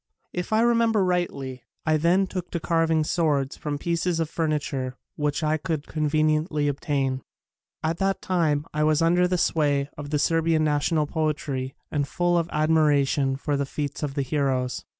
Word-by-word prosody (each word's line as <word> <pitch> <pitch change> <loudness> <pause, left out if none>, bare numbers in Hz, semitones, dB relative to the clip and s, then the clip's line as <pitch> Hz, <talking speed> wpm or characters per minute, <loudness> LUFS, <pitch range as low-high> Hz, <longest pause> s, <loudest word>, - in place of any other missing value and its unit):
If 180 +3 -4
I 220 +1 +4
remember 230 -3 +3
rightly, 140 -8 -2 0.2
I 155 0 +3
then 175 +5 +3
took 185 -2 -5
to 170 - -3
carving 165 -1 +2
swords 150 -4 0
from 150 -1 -4
pieces 170 +2 -1
of 160 -1 -1
furniture 145 -5 -2 0.2
which 150 +1 -1
I 155 0 +2
could 155 -2 -3
conveniently 155 0 +1
obtain. 135 -2 -1 0.6
At 160 +1 -1
that 195 0 +1
time 160 -5 0
I 150 0 +1
was 155 +1 +3
under 175 +2 +4
the 180 0 0
sway 145 -4 +1
of 145 -1 -6
the 150 - +1
Serbian 165 +1 +2
national 150 +1 +1
poetry 145 -4 -2 0.2
and 145 -2 0
full 175 +3 +1
of 170 -1 +1
admira 155 -3 +3
tion 135 -1 0
for 145 +2 -2
the 140 0 0
feats 145 0 -4
of 145 -3 -3
the 140 - 0
heroes. 130 -3 -1
155 Hz, 170 wpm, -25 LUFS, 145-170 Hz, 0.6 s, I